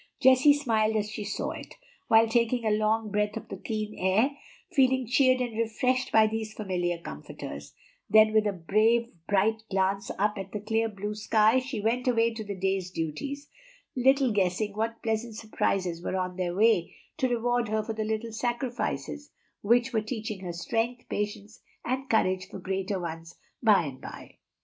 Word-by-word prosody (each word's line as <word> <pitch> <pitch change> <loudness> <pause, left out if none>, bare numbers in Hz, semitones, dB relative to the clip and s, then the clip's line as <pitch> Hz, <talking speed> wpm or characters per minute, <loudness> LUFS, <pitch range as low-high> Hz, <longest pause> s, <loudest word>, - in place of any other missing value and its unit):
Jessie 260 +3 +6
smiled 220 -6 +1
as 210 -1 -1
she 215 - -5
saw 205 - -3
it, - - -9 0.3
while 225 0 +6
taking 235 +1 +1
a 215 - +2
long 215 0 +1
breath 210 +1 0
of 225 - -9
the - - -5
keen 215 +1 -4
air, 200 +9 +3 0.4
feeling 260 -2 +3
cheered 255 +2 +3
and 240 -3 -3
refreshed 240 +3 0
by 220 0 +6
these 220 0 -3
familiar 180 -4 -1
comforters; 75 - -9 0.3
then 215 +1 +6
with 215 -1 +4
a - - +1
brave, 215 +6 +2 0.2
bright 210 +3 +2
glance 195 +1 0
up 210 +1 0
at 195 0 -7
the 210 - -2
clear 225 +2 0
blue 205 0 -5
sky 215 +3 +3
she 260 -3 -5
went 235 +4 0
away 230 -2 +3
to 225 -1 -5
the 200 -1 -5
day's 190 -1 -1
duties, 230 - -4 0.5
little 265 0 +3
guessing 200 +1 0
what 225 +2 -3
pleasant 225 0 -2
surprises 185 -5 -1
were - - -2
on 185 -1 -2
their 180 -1 -2
way 210 -5 +3 0.2
to 260 -4 +1
reward 240 0 0
her 215 0 0
for 225 - -4
the 220 0 -2
little 220 +1 -3
sacrifices 235 - -3 0.3
which 240 +4 +2
were 220 - +2
teaching 215 -2 -5
her 180 -2 -5
strength, 230 +7 -2
patience, 210 +1 -4 0.2
and 265 +2 -2
courage 185 -4 +1
for - - -8
greater 190 +1 -2
ones 165 -1 -7 0.3
by 210 -6 +5
and 135 -4 -7
by. - - -10
215 Hz, 175 wpm, -28 LUFS, 195-235 Hz, 0.5 s, Jessie